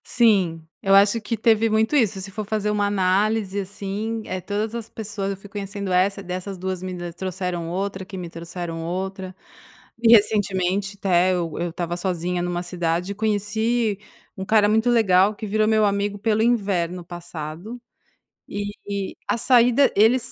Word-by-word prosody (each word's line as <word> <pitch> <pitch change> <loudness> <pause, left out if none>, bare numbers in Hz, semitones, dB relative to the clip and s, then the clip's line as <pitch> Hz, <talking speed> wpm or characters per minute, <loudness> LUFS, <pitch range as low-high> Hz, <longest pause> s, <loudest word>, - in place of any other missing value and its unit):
Sim. 185 -9 +2
Eu 195 0 +4
acho 205 +3 +5
que 230 +2 -3
teve 225 0 +3
muito 220 +6 +2
isso, 220 -8 +2
se 195 +1 -7
for 215 +2 -4
fazer 210 0 -1
uma 205 -1 +1
análise, 200 +1 +1
assim, 200 +3 -4
eh, 185 0 -4
todas 210 +3 -3
as 230 -1 -5
pessoas 205 -2 -4
eu 195 - -3
fui 195 - -13
conhecendo, 200 -1 -4
essa, 195 +2 +2
dessas 185 +2 -5
2 185 0 -4
me 185 0 -5 0.2
trouxeram 180 -2 -4
outra, 190 +2 -3
que 190 +1 -9
me 175 -2 -6
trouxeram 165 0 -6
outra. 185 +2 -4 0.7
E 230 -1 +5
recentemente 200 -2 +2
até 185 -2 +3
eu 170 -3 -2
eu 175 0 -1
estava 175 0 -3
sozinha 180 -1 -2
numa 175 0 -2
cidade 175 +1 -2
e - - -17
conheci 220 +1 0 0.4
um 190 - -4
cara 210 0 +4
muito 220 +3 +3
legal 205 -3 +4
que 215 - -6
virou 215 +1 +1
meu 215 -1 +4
amigo 200 0 0
pelo 220 +1 +1
inverno 190 -7 0
passado 175 +5 -7 0.7
e 205 -1 -5
a - - +1
saída 245 +3 +4
ele 225 +5 +5
195 Hz, 165 wpm, -23 LUFS, 180-215 Hz, 0.7 s, acho